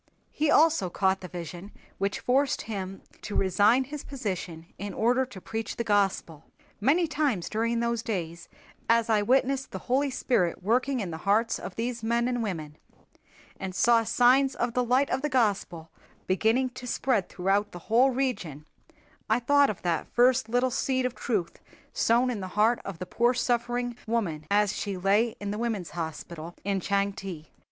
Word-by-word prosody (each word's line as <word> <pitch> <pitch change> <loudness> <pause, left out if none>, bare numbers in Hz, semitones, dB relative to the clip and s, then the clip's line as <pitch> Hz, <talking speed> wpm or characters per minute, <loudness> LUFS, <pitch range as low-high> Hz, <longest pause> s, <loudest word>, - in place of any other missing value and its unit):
He 305 0 0
also 310 - +4
caught 190 +2 +1
the 180 - -7
vision 175 +2 -8 0.3
which 200 +1 -1
forced 270 +2 +1
him 195 -3 -6 0.2
to 205 - -6
resign 205 +7 +3
his 285 +2 -7
position 185 - -5
in 200 +1 -5
order 250 +3 +2
to 205 -7 -10
preach 225 +4 -5
the 235 - -2
Gospel. 195 -7 0 0.3
Many 295 - +3
times 290 - -1
during 230 +2 0
those 235 -1 0
days 170 -6 -4 0.4
as 230 0 +3
I 215 -1 +4
witnessed 265 +4 +1
the - - -6
Holy 275 +3 +1
Spirit 185 -10 0
working 250 +5 +1
in 185 -4 -4
the 160 - -6
hearts 225 +3 +2
of - - -7
these 235 0 -3
men 235 +2 +1
and 245 -1 -1
women 155 -8 -4 0.8
and 190 -1 -5
saw 230 +2 +4
signs 255 +4 +4
of 240 -1 -1
the 250 - +1
light 255 +3 +2
of 260 - 0
the 300 - -1
Gospel 200 - 0 0.3
beginning 225 +7 +1
to 250 0 -9
spread 240 -6 0
throughout 195 +3 0
that - - -8
whole 235 +9 +3
region 240 - -2 0.6
I - - +4
thought 285 +3 +4
of 210 - -5
that 170 -2 -1
first 245 -1 +3
little 245 +2 +1
seed 260 0 0
of 250 - -1
truth 210 -9 -2 0.3
sown 245 +2 +2
in 225 - -4
the 185 - -5
heart 225 +3 +4
of 195 -4 -6
the 185 - -5
poor 240 +7 +1
suffering 240 0 -1
woman 175 -10 -2
as 205 0 +2
she 200 -3 -3
lay 205 +5 +2
in 205 0 -4
the 210 - -4
women's 220 -7 -2
hospital 165 0 -6
in 195 -1 0
Changte. 195 -4 -2
225 Hz, 175 wpm, -27 LUFS, 190-250 Hz, 0.8 s, also